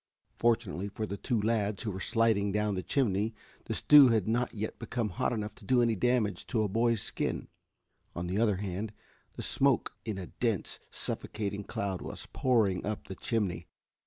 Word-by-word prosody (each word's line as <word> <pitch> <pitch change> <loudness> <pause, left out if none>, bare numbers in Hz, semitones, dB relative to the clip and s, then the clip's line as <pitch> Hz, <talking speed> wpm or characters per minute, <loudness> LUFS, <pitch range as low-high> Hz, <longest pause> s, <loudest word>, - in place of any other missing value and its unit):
Fortunately 110 -5 +1
for 105 +2 -4
the 100 - -4
two 120 +2 -1
lads 105 -1 0
who 110 - -2
were 95 - -5
sliding 110 -2 +2
down 105 0 +1
the 95 - -2
chimney 110 -3 0 0.3
the - - -2
stew 145 -2 +8
had 110 -5 +2
not 120 +2 +1
yet 110 -1 -5
become 115 -3 -2
hot 85 - -1
enough 105 -3 -3
to - - -16
do 130 -1 +3
any 115 -2 +3
damage 120 -1 +1
to 110 -3 +1
a - - +1
boy's 115 +1 +1
skin. - - -2 0.7
On 85 - -3
the 95 +4 -1
other 110 -3 +3
hand, 100 +2 -4 0.4
the - - -5
smoke - - +2
in 105 -3 -3
a 95 - -4
dense, 115 0 -2
suffocating 105 -1 -4
cloud 95 -2 -3
was - - -6
pouring 110 -8 +2
up 105 0 -3
the 95 - -7
chimney. 95 -6 -1
105 Hz, 185 wpm, -31 LUFS, 100-115 Hz, 0.7 s, stew